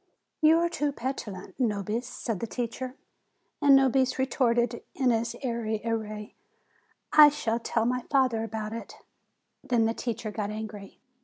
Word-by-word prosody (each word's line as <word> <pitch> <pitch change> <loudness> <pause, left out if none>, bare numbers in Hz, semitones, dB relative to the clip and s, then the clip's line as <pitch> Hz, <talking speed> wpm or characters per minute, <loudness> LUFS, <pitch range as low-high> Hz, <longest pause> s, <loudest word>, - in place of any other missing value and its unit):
"You 315 +1 +6
are 340 +1 +2
too 295 -4 -1
petulant, 230 -8 -5
Nobis," 220 0 -1
said 225 -5 -4
the 230 - -3
teacher. 250 +3 -4 0.7
And 285 -2 +7
Nobis 265 -1 +3
retorted, 240 -3 +1
in 260 -4 +2
his 230 0 -1
airy 230 -3 -1
w 230 -1 +1
r 215 - -5
ay, 210 0 -9 0.8
"I 300 -1 +10
shall 230 -5 -1
tell 230 -1 0
my 250 +1 0
father 255 -5 +2
about 220 -1 -4
it." 230 - -7 0.7
Then 240 -4 +2
the 225 - +1
teacher 230 -2 -4
got 210 -1 -3
angry. 215 -2 -7
235 Hz, 155 wpm, -28 LUFS, 220-260 Hz, 0.8 s, I